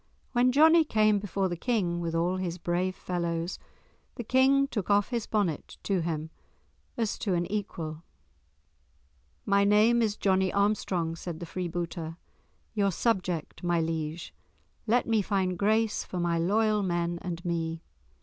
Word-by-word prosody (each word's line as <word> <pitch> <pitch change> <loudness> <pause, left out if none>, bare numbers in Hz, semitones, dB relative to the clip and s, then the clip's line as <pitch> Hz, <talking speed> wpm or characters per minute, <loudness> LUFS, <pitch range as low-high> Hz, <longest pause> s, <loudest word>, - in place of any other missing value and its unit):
When 250 0 +3
Johnie 320 +4 +6
came 215 -7 +3
before 195 -1 -1
the 175 - -3
King 180 -4 0
with 165 -1 -3
all 175 +3 +1
his 180 -2 -3
brave 180 +2 -1
fellows, 170 -1 -3 0.6
the 240 - -5
King 265 +4 +4
took 210 -8 -4
off 205 0 +3
his 235 -3 -2
bonnet 195 -9 -1
to 195 -3 0
him 160 -1 -3 0.7
as 225 -3 -1
to 195 -4 0
an 175 0 0
equal. 165 -7 -4 1.4
"My 200 0 +3
name 215 +4 +4
is 215 -2 0
Johnie 190 -1 +2
Armstrong," 200 -5 0
said 165 -1 -6
the 170 - -5
freebooter, 170 -2 -4 0.6
"your 200 -3 +2
subject, 185 -6 -1
my 175 -1 +2
liege; 160 0 -3 0.5
let 240 +3 +2
me 225 -2 +3
find 190 -2 0
grace 215 +3 +1
for 180 - -5
my 170 -1 +1
loyal 210 +4 +2
men 175 -2 -1
and 175 -1 -5
me." 165 -1 -2
185 Hz, 150 wpm, -28 LUFS, 170-215 Hz, 1.4 s, Johnie